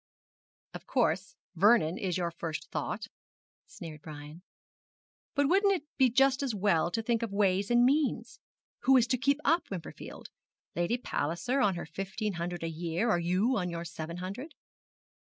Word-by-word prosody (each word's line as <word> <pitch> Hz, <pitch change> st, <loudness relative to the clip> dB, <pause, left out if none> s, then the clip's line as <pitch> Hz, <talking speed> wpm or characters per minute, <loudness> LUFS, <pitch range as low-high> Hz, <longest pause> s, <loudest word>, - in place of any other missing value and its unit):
'Of -, -, -9 dB
course, 190 Hz, -, 0 dB, 0.2 s
Vernon 185 Hz, -2 st, +4 dB
is 185 Hz, -3 st, -1 dB
your 170 Hz, -2 st, -1 dB
first 165 Hz, -1 st, -5 dB
thought,' -, -, -3 dB, 0.6 s
sneered 155 Hz, -3 st, -9 dB
Brian. 150 Hz, +2 st, -10 dB, 0.9 s
'But 285 Hz, -1 st, +3 dB
wouldn't 395 Hz, +4 st, +4 dB
it 345 Hz, -, -5 dB
be 260 Hz, -2 st, +5 dB
just 270 Hz, +3 st, +3 dB
as 260 Hz, -6 st, -1 dB
well 190 Hz, -5 st, +2 dB
to 225 Hz, +5 st, -2 dB
think 230 Hz, 0 st, +1 dB
of 230 Hz, -3 st, -3 dB
ways 200 Hz, -1 st, +2 dB
and 240 Hz, 0 st, +5 dB
means! 285 Hz, +2 st, +1 dB, 0.4 s
Who 265 Hz, 0 st, +5 dB
is 240 Hz, -, +4 dB
to 255 Hz, +1 st, 0 dB
keep 280 Hz, +3 st, +2 dB
up 330 Hz, +3 st, +2 dB
Wimperfield? 185 Hz, -4 st, -8 dB, 0.5 s
Lady 175 Hz, +8 st, +1 dB
Palliser, 240 Hz, -, -1 dB
on 195 Hz, -3 st, +3 dB
her 170 Hz, -, -5 dB
fifteen 195 Hz, +6 st, -4 dB
hundred 175 Hz, 0 st, -4 dB
a -, -, -1 dB
year; 170 Hz, +7 st, -1 dB
or 175 Hz, -, +2 dB
you, 185 Hz, +9 st, +1 dB
on 180 Hz, -1 st, -2 dB
your 170 Hz, 0 st, -5 dB
seven 165 Hz, +1 st, -6 dB
hundred?' 200 Hz, -, -6 dB
195 Hz, 165 wpm, -30 LUFS, 170-250 Hz, 0.9 s, be